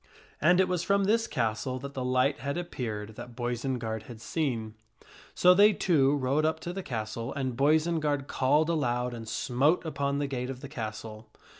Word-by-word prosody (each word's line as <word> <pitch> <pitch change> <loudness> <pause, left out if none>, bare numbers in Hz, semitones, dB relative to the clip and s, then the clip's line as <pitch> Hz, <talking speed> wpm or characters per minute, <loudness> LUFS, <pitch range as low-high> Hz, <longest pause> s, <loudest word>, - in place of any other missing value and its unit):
And 175 +4 +5
it 190 - +4
was 180 -2 0
from 200 +2 +2
this 225 +3 +2
castle 120 +2 -1
that 140 +2 -7
the 130 - -3
light 130 +2 +1
had 140 +3 -3
appeared 110 -11 -4
that 120 -1 -9
Boisenard 120 -2 -2
had 115 -2 -9
seen. 115 -6 -2 0.6
So 180 0 +6
they 205 +3 +6
two 145 -8 +3
rode 140 +2 +1
up 160 0 +1
to 175 - -5
the 195 - -4
castle 115 - -4
and 130 -4 -3
Boisenard 150 0 +2
called 145 +3 +2
aloud 125 -5 0
and 115 -1 -7
smote 140 +11 +1
upon 140 -3 -1
the 145 - 0
gate 130 -2 -3
of 130 -1 -6
the 140 - -8
castle. 110 -4 -7
135 Hz, 180 wpm, -29 LUFS, 120-155 Hz, 0.6 s, So